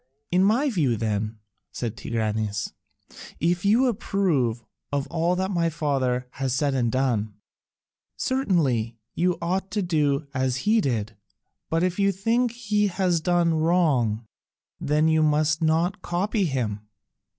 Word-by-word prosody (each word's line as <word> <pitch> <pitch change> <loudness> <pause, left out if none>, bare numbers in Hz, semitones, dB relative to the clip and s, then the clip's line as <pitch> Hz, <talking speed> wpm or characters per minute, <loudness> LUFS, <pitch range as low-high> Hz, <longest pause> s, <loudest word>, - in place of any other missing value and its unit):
"In 180 +1 +4
my 230 +9 +3
view, 150 - +1
then," 110 0 -2 0.3
said 115 -3 -4
Tigranes, 110 -3 -2 0.7
"if 175 +2 +1
you 220 +6 +4
approve 175 - 0 0.3
of 140 -1 0
all 170 +2 +1
that 190 +1 -1
my 170 -3 +1
father 135 -6 -1
has 135 -2 -2
said 140 +1 +1
and 120 -3 +1
done, 115 -6 0 0.8
certainly 145 - 0 0.2
you 180 +1 +1
ought 190 +3 -1
to 205 +1 -1
do 150 -4 +1
as 130 -1 -1
he 220 +1 +4
did, 110 - -2 0.5
but 165 +1 +1
if 185 +1 -1
you 200 0 +3
think 230 +6 +1
he 210 -3 0
has 180 -3 0
done 175 0 +2
wrong, 155 -10 +2 0.5
then 150 +2 +2
you 160 0 +3
must 155 +1 +2
not 165 +5 +1
copy 195 +4 0
him." 120 -9 -2
160 Hz, 140 wpm, -25 LUFS, 125-185 Hz, 0.8 s, In